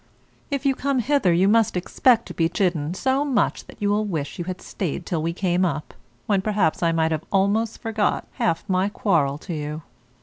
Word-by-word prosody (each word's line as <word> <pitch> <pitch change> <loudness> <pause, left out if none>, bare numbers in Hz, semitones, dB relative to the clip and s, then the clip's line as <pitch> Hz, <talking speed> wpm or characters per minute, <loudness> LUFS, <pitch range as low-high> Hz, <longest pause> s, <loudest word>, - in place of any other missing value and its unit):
If 280 -1 -2
you 275 - +4
come 275 +1 -1
hither 250 -5 +2
you 180 +3 +3
must 220 -3 +3
expect 230 +6 +3
to - - -8
be 165 -1 +1
chidden 175 -3 0
so 265 +7 +1
much 275 -4 0
that - - -14
you 205 -1 +1
will 210 +1 +2
wish 160 -9 -3
that - - -12
you 175 - -3
had 185 0 -5
stayed 175 -2 -4
till 165 -3 -1
we 165 +2 -1
came 180 0 0
up, 155 -4 -2 0.3
when 200 -2 +2
perhaps 200 -6 +1
I 170 -1 +3
might 160 -1 +1
have 155 -1 -1
almost 205 +3 +1
forgot 220 -2 -1 0.2
half 165 +4 0
my 190 0 +1
quarrel 160 -10 +1
to 170 +3 -7
you. 150 0 -4
185 Hz, 210 wpm, -23 LUFS, 165-220 Hz, 0.3 s, you